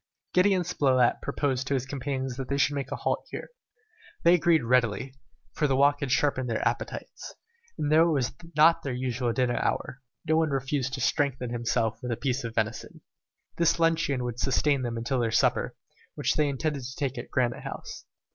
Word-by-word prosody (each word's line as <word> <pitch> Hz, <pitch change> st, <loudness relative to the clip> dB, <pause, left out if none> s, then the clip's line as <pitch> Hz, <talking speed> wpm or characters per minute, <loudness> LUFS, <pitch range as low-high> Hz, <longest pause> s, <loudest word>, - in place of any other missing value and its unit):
Gideon 185 Hz, 0 st, +4 dB
Spilett 130 Hz, -8 st, +2 dB
proposed 135 Hz, -2 st, -1 dB
to 140 Hz, -, +1 dB
his 130 Hz, -1 st, -1 dB
companions 130 Hz, -1 st, -3 dB
that 135 Hz, -1 st, -5 dB
they 140 Hz, -, 0 dB
should 145 Hz, +1 st, +2 dB
make 140 Hz, -2 st, -4 dB
a -, -, -1 dB
halt -, -, -1 dB
here. -, -, -7 dB, 0.7 s
They 170 Hz, -, +6 dB
agreed 170 Hz, -3 st, +3 dB
readily, 120 Hz, 0 st, +1 dB, 0.4 s
for 150 Hz, -, +1 dB
their 135 Hz, -, +1 dB
walk 145 Hz, +1 st, +4 dB
had 140 Hz, -3 st, -3 dB
sharpened 130 Hz, -1 st, +1 dB
their 115 Hz, -, 0 dB
appetites; -, -, -5 dB, 0.4 s
and 150 Hz, 0 st, 0 dB
although 165 Hz, +2 st, +6 dB
it -, -, +2 dB
was 130 Hz, -5 st, 0 dB, 0.2 s
not 160 Hz, +2 st, +6 dB
their 135 Hz, -3 st, -3 dB
usual 125 Hz, -1 st, -1 dB
dinner 125 Hz, 0 st, 0 dB
hour, 135 Hz, -, -2 dB, 0.3 s
no 160 Hz, +1 st, +3 dB
one 160 Hz, -1 st, +2 dB
refused 135 Hz, -1 st, -1 dB
to 130 Hz, -, -6 dB
strengthen 130 Hz, -3 st, 0 dB
himself 115 Hz, -2 st, -1 dB
with 125 Hz, -, -4 dB
a 115 Hz, -, -1 dB
piece 130 Hz, +1 st, -1 dB
of 115 Hz, -1 st, -6 dB
venison. 110 Hz, -1 st, -3 dB, 0.6 s
This 170 Hz, 0 st, +2 dB
luncheon 165 Hz, -6 st, +1 dB
would 120 Hz, -1 st, -4 dB
sustain 140 Hz, +1 st, +2 dB
them 120 Hz, -2 st, -3 dB
till 130 Hz, +2 st, 0 dB
their 115 Hz, -1 st, +1 dB
supper, 115 Hz, -, +1 dB, 0.4 s
which -, -, 0 dB
they 150 Hz, -2 st, +2 dB
intended 140 Hz, +1 st, -2 dB
to 130 Hz, +1 st, -7 dB
take 135 Hz, -3 st, -2 dB
at -, -, -8 dB
Granite 120 Hz, -2 st, 0 dB
House. -, -, -8 dB
135 Hz, 195 wpm, -27 LUFS, 125-145 Hz, 0.7 s, They